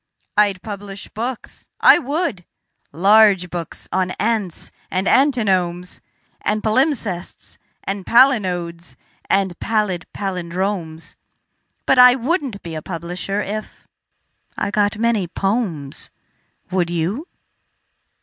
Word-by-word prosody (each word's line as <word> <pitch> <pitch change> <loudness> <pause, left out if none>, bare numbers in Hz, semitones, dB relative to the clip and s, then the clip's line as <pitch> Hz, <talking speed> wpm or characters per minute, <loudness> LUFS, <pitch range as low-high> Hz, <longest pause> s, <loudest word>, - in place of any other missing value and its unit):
I'd 205 -3 +2
publish 200 -1 -7
books, 240 +3 -6
I - - +7
would 290 - -2 0.5
large 195 +1 +5
books 170 -2 -5
on 185 -1 +1
ants 215 -6 -1 0.2
and 190 +1 -1
antinomes 190 -10 +2 0.4
And 210 0 0
palimpsests 220 - -1 0.2
and 195 0 -3
palinodes 180 -9 +2 0.3
and 190 -3 +1
pallid 210 -6 -1
pallindromes: 180 -3 -3 0.7
But 270 - +4
I 250 0 +9
wouldn't 265 - -2
be 170 - -6
a 155 - -4
publisher 175 +4 -4
if.... 215 +1 -6 0.7
I 200 - -1
got 205 0 +1
many 225 -4 +1
"pomes." 185 - -1 0.6
Would 180 -2 +1
you? 175 - -2
200 Hz, 100 wpm, -20 LUFS, 175-225 Hz, 0.7 s, I